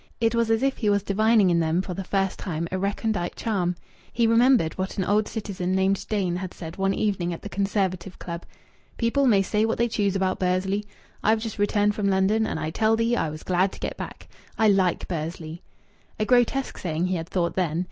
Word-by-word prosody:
It 225 -1 +2
was 230 -1 +1
as 225 +2 +2
if 270 0 +1
he 215 - 0
was 205 -1 +2
divining 215 -1 +3
in 170 - +3
them 165 +1 +1
for 185 - -5
the 195 - -4
first 195 0 -1
time 170 -3 -3
a 185 - -1
recondite 200 -2 -1
charm. 180 -6 -1 0.4
He 235 - +2
remembered 230 -6 +4
what 190 0 -4
an 190 - +1
old 210 +3 +2
citizen 195 -4 -3
named 190 +1 +1
Dain 190 -5 0
had 185 -1 -6
said 165 -1 -8
one 195 0 0
evening 185 -5 0
at 165 - -9
the 205 - -6
Conservative 195 -2 -1
Club: 170 -1 -6 0.5
"People 260 +4 +2
may 200 -5 +4
say 210 +2 0
what 225 0 0
they 235 - +2
choose 205 -4 0
about 190 -1 0
Bursley. 190 +3 0 0.4
I've 220 +1 +4
just 220 -2 -6
returned 205 0 +2
from 200 -1 0
London 200 +3 +2
and - - -3
I 155 +1 -3
tell 220 +5 +2
thee 230 +1 +1
I 160 - 0
was 155 +1 -8
glad 185 +1 +1
to - - -11
get - - -3
back. - - -8 0.3
I 220 -1 +4
like 190 -3 +2
Bursley." 165 0 -5 0.6
A 215 - +1
grotesque 250 +3 +2
saying, 165 -1 -1
he 185 0 0
had 165 +1 -6
thought, 175 -2 0
then. 170 -3 0
195 Hz, 220 wpm, -25 LUFS, 180-220 Hz, 0.6 s, remembered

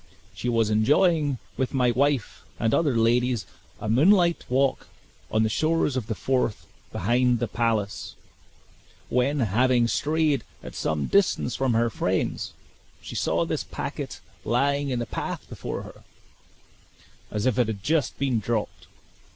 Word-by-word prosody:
She 125 - -3
was 115 -2 +2
enjoying 145 - +3 0.2
with 130 +1 -1
my 125 -2 +3
wife 140 0 0 0.2
and 115 - +1
other 145 -7 +2
ladies 120 0 +2 0.3
a - - -5
moonlight 170 - +4
walk 135 +1 +1 0.4
on 110 - +2
the - - +2
shores 155 +4 +1
of 125 -5 -2
the 110 - -2
Forth 125 -2 -1 0.3
behind 120 +4 +2
the 120 0 -1
palace, 110 -4 -1 0.9
when, 135 +3 +1
having 120 +3 +3
strayed 155 +2 +1 0.2
at - - -8
some 75 -2 -1
distance 190 -11 +2
from 130 -3 +1
her 115 0 +2
friends, - - -1 0.5
she - - -9
saw - - 0
this - - -2
packet - - -6 0.2
lying 140 +4 +1
in 125 - -1
the 120 - -2
path - - -5
before - - -5
her, - - -13 1.3
as 105 0 -2
if 130 -2 +2
it 120 - +3
had 100 -3 -4
just 155 -5 0
been 130 -4 +1
dropped. 110 0 -3
125 Hz, 145 wpm, -25 LUFS, 115-140 Hz, 1.3 s, moonlight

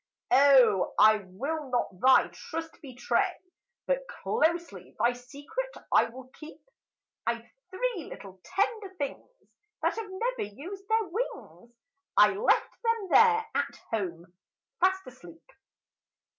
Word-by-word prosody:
O! 255 -8 +5
I 215 0 +7
will 280 +10 -4
not 240 -7 -2
thy 260 +4 +5
trust 325 0 -7
betray, 260 -3 -1 0.5
But - - -1
closely 345 -8 -2
thy 240 +1 +3
secret 290 - -7 0.2
I - - +6
will 255 +2 -10
keep. 305 +3 -12 0.7
"I 235 - +2
've 230 - -22 0.2
three 410 -3 -2
little 190 -1 -11
tender 395 +1 -2
things, 280 -2 -5 0.5
That - - +1
have 445 -3 -5
never 415 - -3
used 390 - -9
their 445 0 +2
wings! 355 - -6 0.5
I - - +7
left 425 +5 +1
them 460 -4 0
there, 450 -1 +6
at - - -1 0.2
home, 180 -5 -4 0.5
fast 380 +1 +2
asleep." 260 +6 -14
320 Hz, 125 wpm, -28 LUFS, -, 0.7 s, I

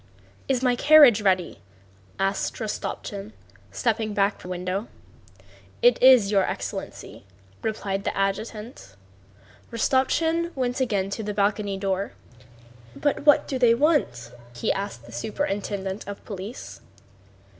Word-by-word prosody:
"Is 260 -1 0
my 250 -1 +3
carriage 280 -5 +7
ready?" 185 -4 0 0.6
asked 195 0 -1
Rostopchín, 210 -1 -5 0.4
stepping 215 - -1
back 200 +1 +1
from 180 - -10
the - - -2
window. 185 +5 -3 1.0
"It 245 0 +5
is, 250 -6 +7
your 200 -2 +4
excellency," - - -6 0.4
replied 200 -3 -3
the - - -3
adjutant. 195 - -4 0.8
Rostopchín 320 +8 +1
went 255 -1 -1
again 200 -6 0
to 220 - -3
the 210 -1 -4
balcony 200 -1 0
door. 195 0 -2 0.8
"But 290 0 -1
what 290 - +5
do 265 - -3
they 235 -2 +5
want?" 240 - +1 0.2
he 120 - 0
asked 195 - -5
the 120 - -13
superintendent 200 - -3
of 200 0 -8
police. 205 +4 -8
210 Hz, 125 wpm, -25 LUFS, 195-245 Hz, 1.0 s, carriage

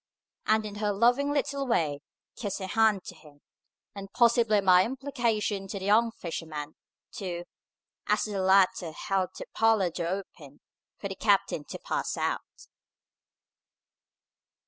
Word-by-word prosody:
And, 220 0 +3
in 205 -1 -6
her 210 0 0
loving 245 +7 +3
little 280 -1 -1
way, 155 - 0 0.3
kissed 205 -4 -4
her 190 - -5
hand 215 0 +2
to - - -8
him, 145 -2 -18 0.5
and 195 -1 -9
possibly 235 -2 +4
by 185 -2 +6
implication 235 -6 -2
to 200 - -5
the 190 - -5
young 220 +3 +4
fisherman, 160 -5 -6 0.4
too, 175 -3 -5 0.6
as 210 0 +2
the 205 -3 -2
latter 185 -3 +3
held 190 0 -1
the - - -6
parlour 220 -5 +3
door 170 0 -3 0.2
open 145 -3 -16 0.4
for - - -5
the - - -5
captain - - +1
to - - -7
pass - - -3
out. - - -3
200 Hz, 140 wpm, -28 LUFS, 180-225 Hz, 0.6 s, by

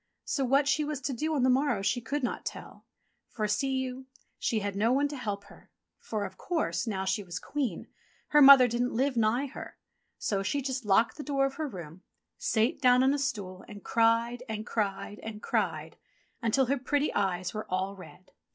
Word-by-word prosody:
So 275 - -1
what 275 +3 +3
she 285 +2 +2
was 295 -2 -3
to 270 - -2
do 310 +6 -1
on 270 - +1
the 260 - +4
morrow 255 -6 +1
she 195 +5 +1
could 275 +5 -3
not 245 - -2
tell; - - -8 0.4
for, 215 -2 -2
see 240 +6 0
you, 260 0 -4 0.3
she 230 - 0
had 200 -1 -3
no 220 +4 +2
one 280 +3 +3
to 295 - -6
help 205 -6 -4
her; - - -18 0.3
for, 210 -2 -3
of 190 -1 -10
course, 320 -8 -1
now 190 -3 -2
she 190 +2 0
was 175 -3 -6
Queen, 260 - -3 0.4
her 295 - +5
mother 270 -2 +10
didn't 245 +1 -1
live 265 +2 +1
nigh 230 +4 +2
her. 280 - -9 0.4
So 200 -2 -1
she 280 +8 -1
just 260 -3 -3
locked 215 +5 +3
the 295 - -5
door 275 -2 +1
of 275 - -2
her 310 -1 -2
room, 175 - -9 0.4
sate 225 +5 +1
down 250 -1 +5
on 265 +1 +4
a 290 - -1
stool 190 -8 -3
and 205 -1 -11
cried 230 +1 +2
and 220 0 -4
cried 205 -2 -3
and 220 -1 -7
cried 165 -9 -2 0.4
until 230 +4 +2
her 275 +2 0
pretty 290 +3 0
eyes 185 -2 -1
were 215 0 -5
all 190 +2 -1
red. 185 0 -14
235 Hz, 205 wpm, -29 LUFS, 200-275 Hz, 0.4 s, mother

